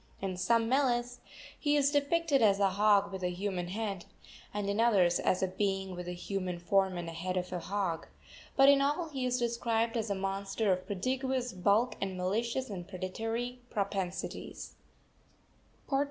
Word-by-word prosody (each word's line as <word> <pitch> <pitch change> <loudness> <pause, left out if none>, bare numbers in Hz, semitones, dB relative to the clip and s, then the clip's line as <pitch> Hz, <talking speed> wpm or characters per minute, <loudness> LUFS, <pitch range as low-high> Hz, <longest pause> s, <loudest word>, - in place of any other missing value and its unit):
In 190 -1 -3
some 230 +5 +2
meles 245 -2 +1 0.4
he 295 -1 +2
is 285 -1 +3
depicted 290 0 +2
as 200 -3 +4
a 195 -1 +3
hog 205 0 +4
with 190 -1 -5
a 180 - 0
human 180 -1 -3
head, 200 -1 -3 0.5
and 205 -1 -3
in 200 +2 0
others 195 -7 +4
as 185 - +1
a - - +3
being 195 0 -1
with 180 0 -6
a 180 - -3
human 180 0 -3
form 190 +1 +1
and 175 -1 -4
head 175 +3 -3
of 180 0 -3
a 180 - -1
hog; 190 -3 -2 0.5
but 270 0 +6
in 280 0 +7
all 295 +4 0
he 265 -4 -2
is 250 0 +1
described 235 -1 0
as 225 -2 -1
a 200 - 0
monster 195 +1 0
of 185 0 -5
prodigious 255 +5 -1
bulk 200 +7 +2
and 190 -1 -2
malicious 230 +8 -1
and 180 -4 -6
predatory 225 +6 -4
propensities. 195 -3 -3
200 Hz, 170 wpm, -31 LUFS, 185-240 Hz, 0.5 s, in